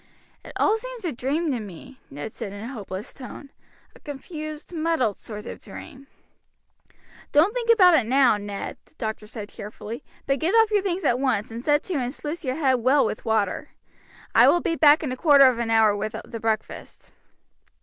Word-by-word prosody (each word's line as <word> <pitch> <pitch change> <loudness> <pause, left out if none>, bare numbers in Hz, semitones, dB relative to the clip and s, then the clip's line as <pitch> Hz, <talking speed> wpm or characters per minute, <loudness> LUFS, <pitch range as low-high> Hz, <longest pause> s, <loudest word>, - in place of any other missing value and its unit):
"It - - -11
all 435 +2 +2
seems - - -7
a 335 - 0
dream 285 +6 -1
to 250 - -1
me," 215 +6 -11
Ned 145 +10 -7
said 200 - -6
in 205 +1 -8
a 245 +4 -6
hopeless 200 -1 -7
tone, 275 +1 -10 0.4
"a - - -15
confused, 305 +2 -7
muddled 315 - 0
sort 210 -2 -8
of - - -8
dream." 275 +1 -11 1.2
"Don't 330 +8 +4
think 480 -2 -3
about 370 -6 +7
it 255 -9 +3
now, 260 -2 +4
Ned," 205 -1 -6
the - - -30
doctor 220 -5 -5
said 210 -2 -8
cheerfully, 215 +5 -8 0.2
"but 275 0 0
get 340 - +1
off 450 -1 +5
your 415 -1 +3
things 380 -1 -2
at 245 - +2
once, 235 -6 0
and 230 +2 -6
set 295 +1 +2
to 365 -5 -2
and 250 -1 -2
sluice 305 +4 -5
your 260 -2 -2
head 265 -5 +2
well 265 +4 +4
with 215 - -4
water. 220 +5 0 0.6
I - - +7
will 350 - +5
be 330 - -1
back 305 0 +6
in 280 - -2
a - - -2
quarter 280 0 +6
of 255 -3 +3
an 235 -1 -1
hour 220 -2 +4
with 215 +1 -4
the 230 - -7
breakfast." 220 -1 -4
265 Hz, 200 wpm, -24 LUFS, 220-315 Hz, 1.2 s, about